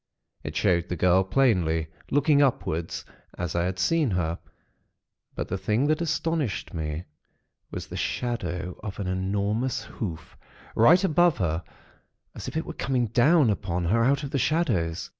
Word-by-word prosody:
It - - -6
showed 85 0 +2
the 90 - -1
girl 90 +3 +4
plainly, 90 -9 +2 0.2
looking 145 +1 +4
upward, 90 - 0 0.5
as 90 -1 -3
I 85 0 +1
had 90 0 -2
seen 150 - +2
her; 85 -3 -1 1.0
but - - -3
the 95 - -3
thing 105 +8 +1
that 155 +2 +1
astonished 160 - -1
me, 80 0 -3 0.7
was - - -6
the - - -9
shadow 90 -8 -3
of 105 -1 -6
an 100 - -2
enormous 100 +6 -1
hoof, 85 -8 -6 0.4
right 170 - +6
above 175 -1 +3
her, 85 -2 -1 0.7
as - - -8
if - - -4
it 160 - -2
were 170 - -6
coming 125 -6 0
down 130 +2 +4
upon 90 -3 -2
her 115 +7 +3
out 140 +4 +2
of 140 - -5
the 140 - 0
shadows. 115 - 0
105 Hz, 160 wpm, -26 LUFS, 90-140 Hz, 1.0 s, right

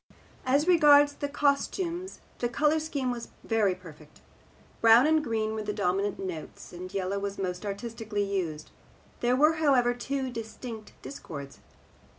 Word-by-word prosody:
As 280 +5 +3
regards 290 -4 +6
the 285 - -4
costumes 335 +6 -1 0.2
the 240 - 0
colour 300 +5 +2
scheme 285 -5 -2
was 235 -1 -5 0.2
very 210 -5 +2
perfect. 155 -4 -15 0.6
Brown 230 +3 +7
and 310 0 +3
green 220 -3 -1
were 220 - -3
the 210 0 -3
dominant 200 0 0
notes, 180 -4 -7
and 180 +1 -8
yellow 195 0 -2
was 200 0 -4
most 185 +1 -3
artistically 210 0 -3
used. 180 -6 -3 0.5
There 245 +1 +2
were, 305 +4 +4
however, 265 -6 +3
two 260 +1 -3
distinct 225 -1 -7
discords. 140 - -8
230 Hz, 145 wpm, -28 LUFS, 195-285 Hz, 0.6 s, Brown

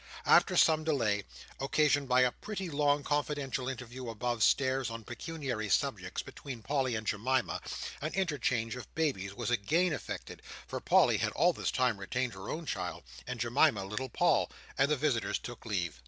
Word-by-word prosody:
After - - +5
some 155 -1 +5
delay, 115 -10 +1 0.3
occasioned 145 0 +2
by 125 0 +5
a 125 -1 +4
pretty 195 - -5
long 145 0 +2
confidential 140 -3 -1
interview 125 -1 -6
above 120 +1 -2
stairs 130 +3 +3
on 115 0 -6
pecuniary 125 -3 -4
subjects, - - 0
between 125 -5 -8
Polly 135 -3 0
and 110 0 -3
Jemima, 125 +6 0 0.4
an 155 +2 -2
interchange 130 -11 0
of 125 - -9
babies 100 -12 -1
was 120 +1 -2
again 155 - +2
effected—for 145 - -7
Polly - - +4
had - - 0
all - - +4
this - - -2
time 125 -5 +1
retained 120 +4 -2
her 95 +1 -8
own 165 +1 -4
child, - - -4 0.2
and 125 -1 -4
Jemima 120 -2 +3
little 105 +7 -4
Paul—and 135 +3 +1
the 150 - +2
visitors 130 -5 +1
took 120 -1 -9
leave. 85 - -2
130 Hz, 160 wpm, -32 LUFS, 115-145 Hz, 0.4 s, After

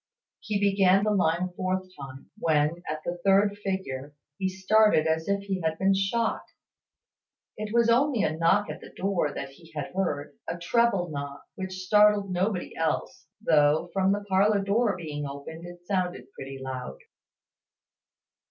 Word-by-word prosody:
He 210 -2 -2
began 195 -1 +4
the 215 - +2
line 175 -3 +2
a 185 - -3
fourth 185 +1 -2
time, 135 -1 -10
when, 155 +1 +1
at 155 0 -3
the 175 0 -3
third 200 +1 +4
figure, 145 -8 -4 0.2
he 190 -1 0
started 190 -2 +3
as 160 0 0
if 200 0 +1
he 195 -2 -3
had 160 -1 -1
been 195 +2 +3
shot. 195 +4 0 1.1
It 210 0 -5
was 235 0 +3
only 245 0 +3
a 155 - 0
knock 180 +6 +3
at - - -7
the - - -11
door 185 -6 -1
that 140 - -6
he 160 +4 -17
had 150 -2 -5
heard; 145 -7 -2
a 170 - -3
treble 190 0 +1
knock, 140 -1 -6
which 185 -1 -6
startled 210 0 +4
nobody 185 +1 -1
else, 155 -4 -2 0.2
though, 150 -1 +3
from 190 0 +2
the 205 0 -1
parlour 200 +1 +3
door 210 +2 +1
being 150 -4 -5
open, 140 +4 -8
it 175 0 -12
sounded 180 -9 -2
pretty 135 0 -8
loud. 130 - -6
185 Hz, 160 wpm, -27 LUFS, 155-200 Hz, 1.1 s, began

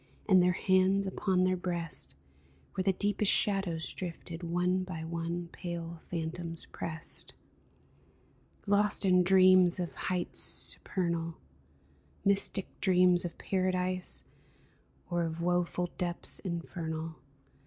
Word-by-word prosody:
And 190 -3 +6
their 180 0 +3
hands 190 +2 +3
upon 190 -1 +1
their 185 0 +3
breasts, 175 -3 -3 0.6
Where 190 - -1
the 195 - +4
deepest 205 +2 +2
shadows 195 -6 +1
drifted. 170 -1 -6
One 180 +2 0
by 175 -3 -6
one 170 +1 -3
pale 170 -2 -6
phantoms 165 0 -4
pressed. 160 0 -6 1.3
Lost 205 0 +3
in 180 -1 +5
dreams 185 -1 +6
of 175 -2 -3
heights 180 -2 -2
supernal, 170 -3 -1 0.9
Mystic 200 -1 +3
dreams 180 -2 +5
of 170 - -5
Paradise, 185 -1 -1 0.9
Or 175 0 +1
of 165 0 -3
woful 175 0 0
depths 175 -2 -2
infernal. 165 -2 -4
180 Hz, 110 wpm, -31 LUFS, 170-185 Hz, 1.3 s, And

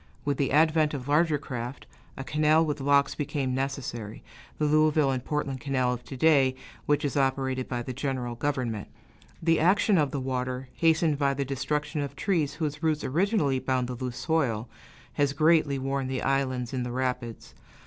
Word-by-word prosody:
With 145 -2 0
the 140 - 0
advent 155 0 +3
of 130 -1 -6
larger 150 +1 +3
craft, 125 -2 -6 0.3
a 135 - -4
canal 155 +3 +3
with 150 -2 -3
locks 140 0 +3
became 140 -3 -2
necessary 125 -5 -4 0.3
the 150 - 0
Louisville 155 -1 +3
and 130 -2 -2
Portland 140 -3 -3
Canal 130 -2 0
of 125 0 -7
to 135 - -8
day, 135 -3 +4 0.3
which 145 0 +2
is 140 - -2
operated 130 -1 0
by 120 -1 -2
the 130 - -5
general 130 -2 -3
government. 120 -4 -2 0.6
The 165 -1 +3
action 190 +3 +4
of 145 -2 +2
the 140 - -3
water, 130 0 -3
hastened 160 -2 +2
by 140 -1 +2
the 140 0 -2
destruction 150 +3 -2
of 140 - -5
trees 170 -8 0
whose 150 -2 -3
roots 155 -2 0
originally 160 - +1
bound 130 -1 0
the 125 - -4
loose 125 0 -5
soil, 125 -9 0 0.5
has 140 -1 +1
greatly 155 -1 +3
worn 135 0 -2
the 130 -1 -3
islands 130 -3 0
in 130 - -1
the 125 0 -3
rapids. 125 -2 -3
140 Hz, 180 wpm, -27 LUFS, 130-150 Hz, 0.6 s, day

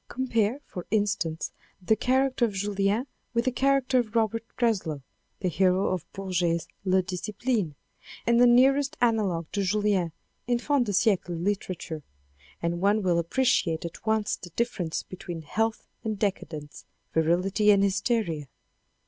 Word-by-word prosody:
Compare, 245 0 0
for 180 - -8
instance, 195 -6 0 0.3
the 195 +4 +2
char 260 +3 +2
acter 260 - -8
of 230 -3 +3
Julien 200 +4 0 0.3
with 235 +1 +2
the 255 - +2
character 265 0 +2
of 230 -2 -3
Robert 225 0 +1
Greslou, 185 - 0 0.4
the 185 - 0
hero 185 +2 +2
of 175 -3 -3
Bourget's 175 -4 -1 0.2
Le 185 -1 +3
Disciple, 200 - -2 0.5
and 235 +1 +4
the 245 - +8
nearest 270 +4 +4
analogue 210 -8 +1
to 200 - -1
Julien 200 -3 +1 0.4
in 245 -1 +2
fin 275 +2 +1
de 205 - -2
siecle 185 -4 +1
literature, 180 -4 -3 0.6
and 170 +1 -1
one 205 +2 +3
will 175 -2 +2
appreciate 170 -3 +1
at 170 - -8
once 220 -2 +1
the 175 - -10
difference 190 -9 -1
between 175 -3 -7
health 225 +7 -1 0.2
and 220 -2 -2
decadence, 160 -7 -3 0.3
virility 180 +6 +2
and 200 -1 +6
hysteria. 200 - 0
200 Hz, 145 wpm, -27 LUFS, 175-235 Hz, 0.6 s, the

